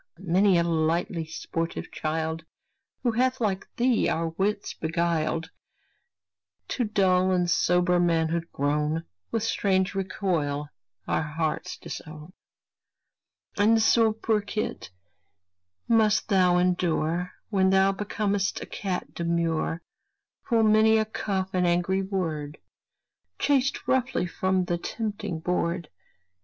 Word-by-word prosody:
many 185 Hz, +1 st, +3 dB
a 170 Hz, -, +3 dB
lightly 165 Hz, 0 st, 0 dB
sportive 165 Hz, +1 st, -4 dB
child, 160 Hz, +1 st, -2 dB, 0.6 s
Who 240 Hz, -, +2 dB
hath 255 Hz, +3 st, +1 dB
like 200 Hz, -4 st, -1 dB
thee 245 Hz, -1 st, +2 dB
our 165 Hz, 0 st, 0 dB
wits 200 Hz, +5 st, -2 dB
beguiled, 160 Hz, 0 st, -1 dB, 1.2 s
To 245 Hz, -, 0 dB
dull 190 Hz, -3 st, +2 dB
and 180 Hz, -1 st, +2 dB
sober 180 Hz, +1 st, +3 dB
manhood 170 Hz, -1 st, +1 dB
grown, 150 Hz, +3 st, 0 dB, 0.3 s
With 225 Hz, -, -1 dB
strange 190 Hz, -4 st, +1 dB
recoil 170 Hz, -7 st, -2 dB, 0.4 s
our -, -, +1 dB
hearts 160 Hz, +3 st, -3 dB
disown. 155 Hz, +2 st, -9 dB, 1.2 s
And 220 Hz, +2 st, +4 dB
so, 225 Hz, 0 st, +4 dB
poor 220 Hz, 0 st, 0 dB
kit! 210 Hz, +1 st, -4 dB, 1.0 s
must 220 Hz, -2 st, +3 dB
thou 180 Hz, -3 st, +4 dB
endure, 180 Hz, -1 st, 0 dB, 0.2 s
When 190 Hz, -2 st, +3 dB
thou 190 Hz, 0 st, +4 dB
becom'st 200 Hz, -1 st, -1 dB
a -, -, -6 dB
cat 190 Hz, -3 st, -4 dB
demure, 170 Hz, -1 st, -1 dB, 0.7 s
Full 230 Hz, -2 st, +4 dB
many 220 Hz, +1 st, +5 dB
a 220 Hz, -, +2 dB
cuff 190 Hz, -3 st, -3 dB
and 180 Hz, -1 st, +2 dB
angry 175 Hz, +2 st, +1 dB
word, 165 Hz, -7 st, -3 dB, 0.8 s
Chased 275 Hz, -2 st, +1 dB
roughly 260 Hz, -7 st, +1 dB
from 185 Hz, +1 st, 0 dB
the 175 Hz, -1 st, -1 dB
tempting 205 Hz, -5 st, -4 dB
board. 170 Hz, -1 st, -1 dB
180 Hz, 115 wpm, -26 LUFS, 165-205 Hz, 1.2 s, many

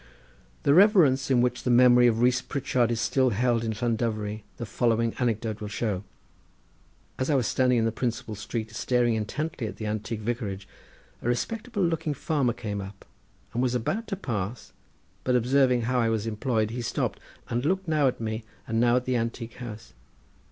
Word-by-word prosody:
The 140 Hz, -, +4 dB
reverence 175 Hz, -, +5 dB
in 125 Hz, -2 st, +4 dB
which 125 Hz, 0 st, 0 dB
the -, -, -2 dB
memory 125 Hz, 0 st, +6 dB
of 115 Hz, -1 st, +2 dB
Rees 125 Hz, +1 st, +3 dB
Pritchard 125 Hz, -3 st, 0 dB
is 115 Hz, -1 st, -1 dB
still 130 Hz, +3 st, +2 dB
held 120 Hz, +1 st, +1 dB
in 110 Hz, -, -1 dB
Llandovery 110 Hz, -2 st, -2 dB, 0.2 s
the 120 Hz, -, -4 dB
following 115 Hz, +1 st, +1 dB
anecdote 110 Hz, -3 st, -1 dB
will 105 Hz, -, -4 dB
show. 105 Hz, -2 st, -2 dB, 1.2 s
As 130 Hz, -, -1 dB
I 150 Hz, -, +3 dB
was 130 Hz, -4 st, +2 dB
standing 125 Hz, +3 st, +2 dB
in 115 Hz, -, +2 dB
the 115 Hz, -, +1 dB
principal 115 Hz, -1 st, -3 dB
street 110 Hz, +1 st, -5 dB
staring 120 Hz, +1 st, +1 dB
intently 135 Hz, +5 st, -3 dB
at -, -, -7 dB
the 110 Hz, -, -6 dB
antique 110 Hz, +1 st, -3 dB
vicarage, 105 Hz, -4 st, -3 dB, 0.5 s
a -, -, -4 dB
respectable 215 Hz, -, -1 dB
looking 165 Hz, -3 st, 0 dB
farmer 140 Hz, -5 st, 0 dB
came 105 Hz, -2 st, -4 dB
up 100 Hz, 0 st, -10 dB, 0.5 s
and 120 Hz, -, 0 dB
was 125 Hz, -1 st, +1 dB
about 195 Hz, -, -2 dB
to 195 Hz, -, -2 dB
pass, 115 Hz, -, -4 dB, 0.5 s
but 125 Hz, -, +1 dB
observing 125 Hz, 0 st, +3 dB
how 125 Hz, +2 st, +1 dB
I 115 Hz, -1 st, +2 dB
was 110 Hz, -1 st, -1 dB
employed 110 Hz, 0 st, -1 dB
he 120 Hz, +1 st, -4 dB
stopped, 115 Hz, -, -2 dB, 0.3 s
and 120 Hz, +1 st, -1 dB
looked 190 Hz, +4 st, 0 dB
now 155 Hz, -3 st, +3 dB
at 125 Hz, -, -1 dB
me 110 Hz, 0 st, -3 dB, 0.2 s
and 115 Hz, 0 st, 0 dB
now 120 Hz, 0 st, +4 dB
at 125 Hz, 0 st, +1 dB
the 130 Hz, -, 0 dB
antique 115 Hz, 0 st, -4 dB
house. 115 Hz, -3 st, -8 dB
120 Hz, 185 wpm, -27 LUFS, 110-130 Hz, 1.2 s, memory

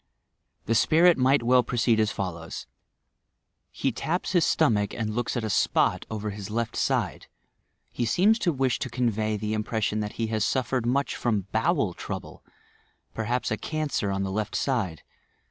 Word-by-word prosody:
The 115 Hz, -, +1 dB
spirit 165 Hz, +9 st, +5 dB
might 130 Hz, 0 st, +3 dB
well 125 Hz, +1 st, +5 dB
proceed 120 Hz, -1 st, +1 dB
as 110 Hz, -1 st, +3 dB
follow?: 85 Hz, -4 st, -5 dB, 1.2 s
'He 135 Hz, -, -1 dB
taps 165 Hz, +9 st, -2 dB
his 175 Hz, -3 st, +3 dB
stomach 105 Hz, -10 st, +2 dB
and 110 Hz, -2 st, -2 dB
looks 120 Hz, +2 st, -1 dB
at 120 Hz, -, -2 dB
a 110 Hz, -, -2 dB
spot -, -, +2 dB
over 105 Hz, -1 st, -3 dB
tua 100 Hz, +1 st, -8 dB
left 115 Hz, 0 st, -2 dB
side. -, -, -1 dB, 0.6 s
He 120 Hz, -, -2 dB
seems 205 Hz, -, +3 dB
to 175 Hz, -, +2 dB
wish 130 Hz, -4 st, 0 dB
to 130 Hz, -, -3 dB
eonwy 110 Hz, -3 st, 0 dB
the 105 Hz, +1 st, -2 dB
impression 110 Hz, 0 st, -1 dB
that 105 Hz, -1 st, -3 dB
he 110 Hz, -1 st, -2 dB
suffered 130 Hz, +2 st, 0 dB
mnch 135 Hz, +4 st, +1 dB
from 105 Hz, -6 st, -1 dB
bowel -, -, +1 dB
tioable, -, -, -7 dB, 0.7 s
perhaps 120 Hz, +2 st, -1 dB
a 110 Hz, -, 0 dB
cancer 155 Hz, -9 st, -2 dB
on 95 Hz, 0 st, -1 dB
the 95 Hz, -, -3 dB
left 105 Hz, +2 st, -2 dB
side. 105 Hz, -, -1 dB
115 Hz, 165 wpm, -26 LUFS, 105-130 Hz, 1.2 s, spirit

